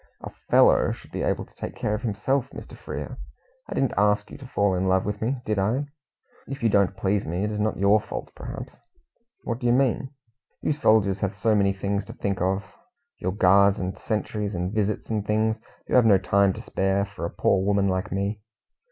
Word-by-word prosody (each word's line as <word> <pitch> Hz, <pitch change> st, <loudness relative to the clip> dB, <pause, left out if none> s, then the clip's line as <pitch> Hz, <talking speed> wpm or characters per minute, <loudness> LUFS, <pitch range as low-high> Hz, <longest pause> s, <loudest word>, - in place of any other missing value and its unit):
"A -, -, -6 dB, 0.2 s
'fellow' -, -, +5 dB
should -, -, -14 dB
be -, -, -4 dB
able -, -, -1 dB
to -, -, -26 dB
take -, -, -7 dB
care 105 Hz, -, -1 dB
of 105 Hz, -, -2 dB
himself, 125 Hz, +4 st, -1 dB
Mr. -, -, -10 dB
Frere. -, -, -7 dB, 0.5 s
I -, -, -4 dB
didn't 135 Hz, -, +1 dB
ask 105 Hz, +1 st, +2 dB
you -, -, -8 dB
to 135 Hz, -, -10 dB
fall 100 Hz, -5 st, +1 dB
in 90 Hz, +1 st, 0 dB
love 95 Hz, 0 st, +2 dB
with 105 Hz, 0 st, -3 dB
me, 125 Hz, +5 st, 0 dB
did 105 Hz, -2 st, 0 dB
I? 115 Hz, +9 st, +1 dB, 0.6 s
If 135 Hz, -2 st, -6 dB
you 115 Hz, -, +4 dB
don't 100 Hz, -2 st, +2 dB
please 100 Hz, 0 st, 0 dB
me, 90 Hz, +4 st, -2 dB
it 105 Hz, -, -1 dB
is 105 Hz, -, -3 dB
not 110 Hz, +1 st, 0 dB
your 100 Hz, +2 st, +4 dB
fault, -, -, -7 dB
perhaps." -, -, -8 dB, 0.6 s
"What 115 Hz, 0 st, -3 dB
do 120 Hz, -, -1 dB
you 120 Hz, -, +4 dB
mean?" 135 Hz, 0 st, +1 dB, 0.5 s
"You -, -, +2 dB
soldiers 110 Hz, -8 st, +3 dB
have 100 Hz, 0 st, -2 dB
so 110 Hz, +2 st, +1 dB
many 100 Hz, -2 st, +3 dB
things 100 Hz, +1 st, -2 dB
to -, -, -9 dB
think 100 Hz, -3 st, -2 dB
of 95 Hz, +2 st, +1 dB, 0.6 s
your 95 Hz, -, -1 dB
guards 100 Hz, +1 st, +5 dB
and 95 Hz, -1 st, -3 dB
sentries, 105 Hz, -2 st, -3 dB
and 90 Hz, +3 st, -2 dB
visits 105 Hz, +1 st, -1 dB
and 105 Hz, -2 st, 0 dB
things. 110 Hz, +1 st, +1 dB, 0.3 s
You -, -, -5 dB
have 125 Hz, -3 st, +6 dB
no 100 Hz, -3 st, +7 dB
time 100 Hz, +1 st, +3 dB
to -, -, -8 dB
spare 95 Hz, +1 st, 0 dB
for 100 Hz, -5 st, -9 dB
a 85 Hz, -, -1 dB
poor 95 Hz, -, +2 dB
woman 100 Hz, 0 st, +2 dB
like 95 Hz, +2 st, -1 dB
me." 100 Hz, +2 st, -2 dB
100 Hz, 215 wpm, -25 LUFS, 95-110 Hz, 0.6 s, no